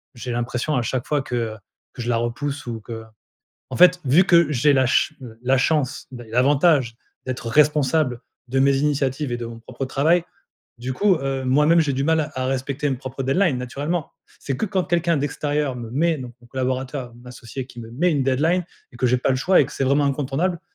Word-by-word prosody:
J'ai 125 +1 -6
l'impression 120 +5 -2
à 125 - +1
chaque 120 +1 -2
fois 150 -2 0
que, 125 - -5
heu, 115 -2 -2 0.4
que - - -7
je 120 - -3
la 120 - +2
repousse 135 +5 -3
ou 115 -2 -5
que 115 +1 -7 0.7
en - - -3
fait 180 0 +6
vu 155 +8 +5
que 170 -4 +4
j'ai 145 +2 +3
la 130 -1 +3
ch 130 - +2 0.3
la 130 +2 +2
chance, 140 -1 0
l 120 -1 -11
l'avantage, 135 +1 +3 0.3
d'être 130 -2 -4
responsable 145 -1 +2 0.3
de 135 +2 +1
mes 135 0 +4
initiatives 140 -1 0
et 120 - -1
de 120 - -5
mon 115 0 -8
propre 135 +3 -6
travail, 160 +6 +2 0.6
du 125 +2 -4
coup, 190 +7 +3
heu, 135 -2 -3
moi-même 150 +6 +4
j'ai 150 -3 +1
du 135 +1 -1
mal 160 -1 +1
à 130 0 -2
respecter 135 +2 -2
mes 135 - -1
propres 130 +1 -6
deadlines 140 +1 +2
naturellement. 145 +7 -3 0.3
C'est 135 - -3
que 220 - -1
quand 185 -2 0
quelqu'un 170 -1 +1
d'extérieur 145 0 -1
me 115 -2 -7
met, 160 +6 +1
donc 125 -2 -8
mon 120 - -18
collaborateur, 130 0 -3
mon 120 - -17
associé, 125 +1 -7
qui 120 -2 -11
me 115 -1 -9
met 165 +10 +1
une 145 -3 +1
deadline 155 +8 +1 0.3
et - - -12
que 125 - +1
j'ai 125 +1 +3
pas 125 - 0
le 130 - +2
choix, 180 +8 +4
et - - +2
que - - -11
c'est 135 - -1
vraiment 140 +2 +3
incontournable, 145 +5 -1
135 Hz, 215 wpm, -22 LUFS, 125-150 Hz, 0.7 s, fait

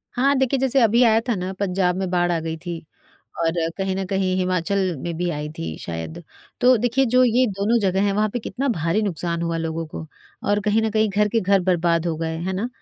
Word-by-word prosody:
हाँ, 270 +3 +3
देखिए 265 0 +1
जैसे 265 +1 +2
अभी 230 +2 +4
आया 225 -2 +5
था - - +3
ना 185 0 -3
पंजाब 180 -2 +1
में 190 0 -2
बाढ़ 175 -1 +1
आ 170 - 0
गई 160 0 -4
थी 170 0 -6 0.6
और 165 -1 +2 0.3
कहीं 190 -1 -1
न 195 - -2
कहीं 190 -1 0
हिमाचल 185 +1 0 0.2
में 170 -1 -3
भी 175 +1 -1
आई 150 -1 -4
थी 80 -1 -4
शायद, 80 -1 -6 0.4
तो 250 0 +6
देखिए 245 +4 +2
जो 255 - +6
ये 250 +1 +3
दोनों 200 +4 +1
जगह 190 -1 +1
हैं 200 - +1
वहाँ 210 +2 +1
पे - - -1
कितना 265 +4 -3
भारी 170 -1 0
नुकसान 170 -3 -2
हुआ 165 0 -1
लोगों 165 0 -3
को 155 +1 -8 0.4
और 205 0 +2
कहीं 215 +1 +2
न 220 - 0
कहीं 215 0 +2
घर 210 +1 +1
के 225 +2 +1
घर 195 0 +3
बर्बाद 175 -2 +1
हो 165 -2 -1
गए 160 0 -3
हैं 180 +3 -3
ना? 205 +6 -2
190 Hz, 235 wpm, -22 LUFS, 170-220 Hz, 0.6 s, तो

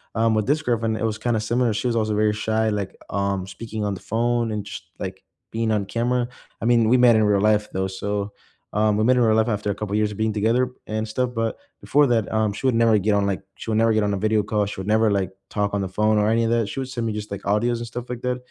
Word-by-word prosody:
um, 115 0 +2
with 110 -1 +1
this 150 +3 +2
girlfriend, 115 -5 0
it 110 - -4
was 110 -1 -1
kinda 115 -1 0
similar, 120 +1 +1
she 115 +4 -1
was 115 - 0
also 110 -2 0
very 105 0 +2
shy, 110 +1 0
like, 100 -2 -3
um, 100 -1 -1
speaking 110 +2 -5
on 100 - -1
the 95 - -8
phone 120 0 0
and 105 -1 -3
just, 100 - -7 0.2
like, 95 0 -6 0.3
being 115 0 -1
on 105 -2 0
camera, 120 +4 0 0.3
I - - -2
mean, 115 -2 +4
we 130 - +5
met 120 -2 +6
in 110 - +4
real 105 -1 +3
life, 105 0 +2
though, 95 0 -1
so, 100 +2 -3 0.4
um, 105 0 +2
we 110 - +2
met 130 +2 +5
in 125 - +3
real 110 -2 +4
life 110 - +3
after 105 -2 -1
a - - -3
couple 105 0 -3
years 105 0 +1
of 105 - -8
being 110 0 0
together 115 +4 +1 0.2
and 110 0 -3
stuff, 125 +3 -1
but 115 -1 -1 0.2
before 145 -1 +3
that, 115 -3 +1
um, 110 -1 +2
she 120 - -6
would 130 - +3
never 115 -1 +4
get 105 +1 +1
on, 100 -1 +2
like 100 -1 -1
she - - -8
would 110 - +1
never 115 0 +4
get 110 - +2
on 100 -1 0
a 100 - -1
video 110 +1 +1
call, 105 -1 0
she 100 -1 -6
would 95 - -7
never 110 0 +3
like 100 -2 0 0.2
talk 105 -1 -1
on 100 - 0
the 95 - -2
phone 105 +3 +1
or 105 0 +2
any 115 +1 +2
of 115 - +1
that, 115 -3 +1
she 135 +7 -4
would 130 - -5
send 120 -3 -3
me 110 - -2
just, 105 -1 -6
like, 100 - -4
audios 115 +4 +1
and 120 0 -6
stuff 120 +1 -7
like 125 -1 -5
that, 125 -1 -1
110 Hz, 290 wpm, -23 LUFS, 105-115 Hz, 0.4 s, met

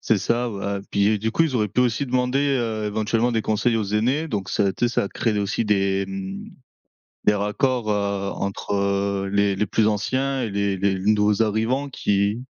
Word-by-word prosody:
C'est 110 - +2
ça 120 +5 0
ouais. 100 -1 -3
Puis 100 +1 +2
du 110 +2 -1
coup 165 - +2
ils 150 -5 0
auraient 105 -2 +1
pu 125 - 0
aussi 125 +2 +1
demander, 130 +3 +1
heu, 110 -3 -2
éventuellement 110 +3 0
des 110 -1 0
conseils 115 +3 +1
aux 110 - 0
aînés, 130 +9 +1
donc 100 -6 -3
ça 105 - +1
a - - +3
été 120 +6 0
ça 120 - 0
a - - -4
créé 110 0 -1
aussi 100 +3 -1
des, 100 -2 +1
mmh, 95 0 -6 0.8
des, 105 - +4
raccords, 110 +3 0
heu, 100 -1 -1
entre, 100 +1 -3
heu, 100 0 0
les 100 -1 +2
les 105 - 0
plus 110 +2 +1
anciens 130 +6 -1
et 115 - -2
les 100 -1 0
les 95 0 0
nouveaux 105 +1 +3
arrivants 115 +6 0
qui 105 -2 0
105 Hz, 200 wpm, -23 LUFS, 100-120 Hz, 0.8 s, des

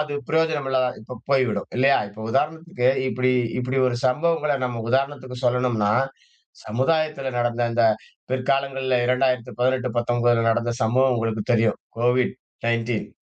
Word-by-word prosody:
அது 150 -1 -3 0.2
பிரயோஜனமில்லாம 145 -5 +1
இப்ப 115 +2 -9
போய்விடும். 130 -7 +1
இல்லையா? 135 +2 +4
இப்ப 105 +2 -13
உதாரணத்துக்கு 160 0 0 0.2
இப்படி 130 0 +1 0.3
இப்படி 125 +1 -1
ஒரு 120 -1 -2
சம்பவங்கள 150 +1 +1
நம்ம 120 -2 -3
உதாரணத்துக்கு 130 0 -1
சொல்லணும்னா 120 -4 +1 0.7
சமுதாயத்தில 135 +3 0
நடந்த 120 0 0
இந்த 120 - +2 0.5
பிற்காலங்கள்ல 130 -1 0
2018-19கள்ல 120 -2 +1
நடந்த 120 +1 0
சம்பவம் 130 +3 +3
உங்களுக்கு 110 -2 -1
தெரியும். 115 -2 +2 0.2
கோவிட் 125 +1 +2 0.3
19 115 -1 -1
125 Hz, 115 wpm, -23 LUFS, 120-135 Hz, 0.7 s, இல்லையா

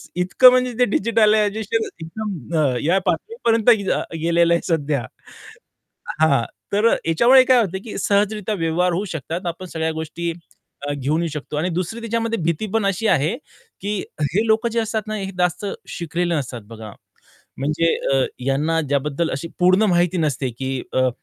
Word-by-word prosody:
इतकं 185 +8 +6
म्हणजे 250 0 +1
ते 245 - +5
डिजिटल 215 0 +3
आहे, 215 - +3 0.6
एकदम 170 - -5
अ, 135 -5 +2
या 175 +6 +3
पातळीपर्यंत 230 - +1
अ, 205 -5 +3 0.2
गेलेलं 170 0 +3
आहे 170 - +1
सध्या. 150 -5 0 1.2
हां, 140 -6 +4 0.3
तर 210 +3 +4 0.2
याच्यामुळे 240 +11 +6
काय 255 -1 +5
होत 190 -3 -3
की 225 - -6
सहजरित्या 205 +1 0
व्यवहार 175 0 0
होऊ 185 +4 -1
शकतात. 165 +4 -5
आपण 170 +2 -4
सगळ्या 160 -2 -2
गोष्टी 165 +2 -3 0.6
घेऊन 145 +4 -1
येऊ 170 - -1
शकतो. 150 0 -6
आणि 160 +4 0
दुसरी 180 +7 -3
त्याच्यामध्ये 230 0 -2
भीती 170 +5 -1
पण 225 -3 +2
अशी 195 +3 0
आहे 160 - +2 0.4
की 205 +1 -3 0.4
हे 215 +3 +2
लोक 220 +2 +2
जे 230 0 0
असतात 220 -1 -2
ना, 215 - -4
हे 195 -2 -4
जास्त 180 +2 0 0.2
शिकलेले 170 +1 -2
नसतात 125 -5 -4
बघा. 110 -1 -9 0.7
म्हणजे 150 +5 0 0.3
अ, 135 -1 +3 0.2
यांना 150 +4 +1
ज्याबद्दल 145 +3 0
अशी 155 +6 -4
पूर्ण 185 +3 +4
माहिती 175 0 +2
नसते 140 -5 0
की 135 0 -3 0.2
अ, 130 0 +2
175 Hz, 160 wpm, -21 LUFS, 160-215 Hz, 1.2 s, इतकं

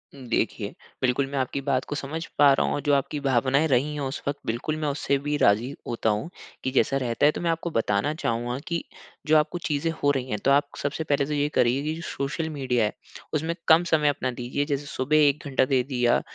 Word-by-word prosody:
उम, 135 -2 -11
देखिए, 110 -2 -1 0.3
बिल्कुल 130 +1 +1
मैं 140 0 -4
आपकी 130 +2 -2
बात 130 -2 +1
को 145 - -2
समझ 155 +4 -4
पा 145 -1 +7
रहा - - +2
हूँ, - - 0
और 145 - -2
जो 145 0 +2
आपकी 140 +2 0
भावनाएँ 135 +3 +2
रही 140 +3 +1
हैं 150 - -4
उस 135 +1 -3
वक़्त 140 0 -1
बिल्कुल, 120 +7 -2
मैं 155 -1 -2
उससे 140 0 0
भी 145 +1 -2
राज़ी 110 +5 +3 0.2
होता 115 -1 0
हूँ 105 +10 -1 0.3
कि 130 - -1
जैसा 135 +1 +2
रहता 125 +1 0
है। 150 - +6
तो - - -6
मैं 170 - 0
आपको 165 +1 -2
बताना 115 +4 +1
चाहूँगा 120 -4 -2
कि 170 -1 -2 0.4
जो 155 0 +6
आपको 150 +3 +1
चीजें 150 +1 0
हो 145 - +5
रही 130 -2 -2
हैं, 105 - -1
तो 140 - +5
आप 145 +1 +4
सबसे 145 +3 -2
पहले 140 -2 +1
तो 150 - -3
ये 145 0 +1
करिए 125 +3 +3
कि 155 +1 -1
जो 165 - -7
सोशल 155 +4 -3
मीडिया 125 -6 0
है, 105 - -2 0.4
उसमें 160 +2 -1
कम 165 +2 +6
समय 150 -2 +4
अपना 130 -3 -1
दीजिए। 125 +4 -2
जैसे 145 -1 -2
सुबह 145 +2 0
1 145 +1 0
घंटा 130 -1 +2
दे 130 -1 +2
दिया, 125 -3 +1
140 Hz, 240 wpm, -25 LUFS, 125-150 Hz, 0.4 s, पा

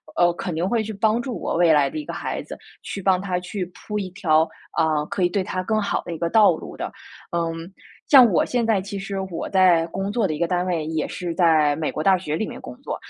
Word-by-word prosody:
呃， 175 0 +4
肯 175 0 -4
定 165 +3 -1
会 230 +1 +1
去 220 0 -5
帮 220 +3 +1
助 245 -2 -5
我 - - -2
未 170 -1 +4
来 145 -3 +4
的 - - -7
一 305 - -5
个 - - -6
孩 - - -4
子， - - -9 0.3
去 200 - -5
帮 185 -1 +3
他 185 -2 -2
去 180 +1 -4
铺 210 +4 -7
一 195 -3 -3
条， 160 -4 +2 0.3
啊， 155 -2 +1
可 185 - -1
以 175 - +3
对 195 +1 -1
他 185 0 -3
更 215 +2 0
好 200 - -1
的 170 - -5
一 - - -5
个 170 +1 -1
道 215 +2 +6
路 - - -9
的。 - - -4 0.4
嗯， 165 -1 -1 0.5
像 270 -3 +9
我 175 - +3
现 245 -1 0
在 220 -3 +2
其 200 +1 -6
实 195 0 -4
我 165 - -4
在 180 -3 +4
工 195 +3 -3
作 220 -3 +1
的 155 - -2
一 - - -8
个 170 - +1
单 180 +1 0
位 165 -4 -1
也 160 -1 -2
是 175 -3 -4
在 160 -4 +3
美 160 -1 -2
国 155 - -3
大 190 +3 +5
学 175 -5 -3
里 220 - -2
面 - - -8
工 - - -10
作， - - -3
180 Hz, 285 characters per minute, -23 LUFS, 165-200 Hz, 0.5 s, 像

